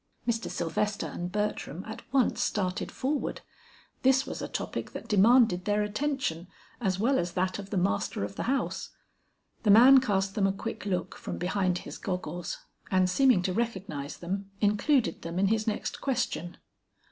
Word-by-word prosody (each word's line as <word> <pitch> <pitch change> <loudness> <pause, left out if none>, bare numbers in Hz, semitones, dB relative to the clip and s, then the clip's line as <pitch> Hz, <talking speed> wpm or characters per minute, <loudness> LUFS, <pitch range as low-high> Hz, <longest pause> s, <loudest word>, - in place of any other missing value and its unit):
Mr. 230 -1 0
Sylvester 200 +5 -1
and 175 +1 -5
Bertram 210 -5 -2
at 220 - -7
once 265 -3 +2
started 185 -3 -1
forward; 280 +2 -2 0.6
this 265 0 +4
was - - -6
a - - -3
topic - - -4
that - - -7
demanded 210 -2 +5
their 210 0 +2
attention 210 - -2 0.3
as 190 -5 +1
well 245 +7 +2
as 175 0 -2
that 185 +2 -1
of 200 -1 -8
the 200 - -2
master 180 - 0
of 100 0 -5
the - - -4
house. 275 0 -1 0.7
The 215 - 0
man 250 +6 +9
cast 195 -6 0
them 200 -2 +2
a 195 - 0
quick 205 +1 -5
look 180 -2 -1
from - - -6
behind 185 0 0
his - - -8
goggles, 175 -2 -4 0.3
and 185 -1 +3
seeming 245 0 +4
to 185 - 0
recognize 190 -10 -3
them, 195 +3 -4
included 210 - +2
them 170 +1 -5
in 195 +1 +3
his 220 0 +1
next 215 - -2
question. 245 - -2
200 Hz, 170 wpm, -29 LUFS, 180-230 Hz, 0.7 s, man